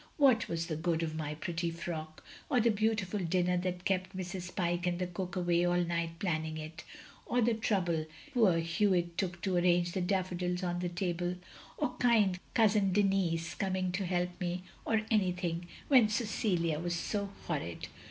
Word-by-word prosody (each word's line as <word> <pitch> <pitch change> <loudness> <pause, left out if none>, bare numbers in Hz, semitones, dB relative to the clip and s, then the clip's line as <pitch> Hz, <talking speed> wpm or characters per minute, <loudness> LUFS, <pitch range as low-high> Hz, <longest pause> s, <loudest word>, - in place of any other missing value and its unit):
"What 260 - +5
was 165 0 -1
the 165 -2 -3
good 165 +1 0
of 160 -1 -2
my 155 -1 -3
pretty 170 +2 -2
frock, 160 -2 -6 0.3
or 260 -4 +3
the 230 0 +4
beautiful 210 -2 0
dinner 180 0 +1
that 180 0 -3
kept 185 0 0
Mrs. 180 -1 -5
Pyke 175 0 0
and 175 -1 0
the 180 - -1
cook 180 +1 -5
awake 175 -1 +2
all 175 0 +2
night 170 -1 -2
planning 160 -3 -1
it; 155 +1 -7 0.4
or 245 - +1
the 235 0 +3
trouble 175 -8 0 0.3
poor 215 -9 +4
Hewitt 170 0 +1
took 180 -2 -2
to 190 -2 +1
arrange 175 0 +3
the 185 - -1
daffodils 180 -1 -1
on 175 -1 -1
the 180 0 -1
table, 175 0 -1 0.4
or - - +1
kind 215 -7 +4 0.2
cotisin 210 -3 +4
Denis 185 -4 +1
coming 185 -1 -1
to 185 +1 -2
help 180 0 -1
me, 180 0 -2 0.2
or 220 -1 +2
any 195 -5 +3
thing 175 -1 -3
— - - -19
^when 245 -6 +7
Cecilia 195 -8 0
was 175 +1 -1
so 200 +3 -2 0.2
horrid. 140 - -3
180 Hz, 180 wpm, -32 LUFS, 170-195 Hz, 0.4 s, ^when